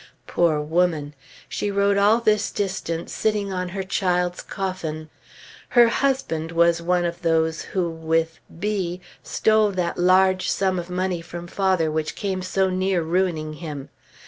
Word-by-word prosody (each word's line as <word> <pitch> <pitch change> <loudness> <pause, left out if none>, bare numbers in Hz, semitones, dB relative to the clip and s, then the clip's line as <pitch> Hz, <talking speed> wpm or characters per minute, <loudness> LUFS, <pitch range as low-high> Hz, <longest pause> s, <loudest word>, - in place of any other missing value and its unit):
Poor 165 -3 +2
woman! 155 -1 0 0.3
she 205 - -2
rode 200 0 +2
all 205 +3 +4
this 215 -3 +2
distance 180 -4 -3
sitting 210 -3 0
on 180 -1 -2
her 190 +1 -4
child's 180 -2 0
coffin. 160 -5 -5 0.6
Her 240 -2 +6
husband 230 - -1
was 170 0 +3
one 175 +1 +1
of 170 0 -4
those 160 -1 +1
who 185 -3 -2
with 165 0 -1 0.2
B 185 -3 -2 0.2
stole 215 -1 +2
that 180 -2 -2
large 185 +1 +4
sum 190 -2 +1
of 175 +1 -7
money 180 -1 -1
from 170 +1 -8
father 185 -3 +1
which 155 0 -2
came 190 -2 -2
so 190 +1 +1
near 185 -1 +1
ruining 165 -2 0
him. 150 -5 -6
180 Hz, 145 wpm, -23 LUFS, 165-195 Hz, 0.6 s, Her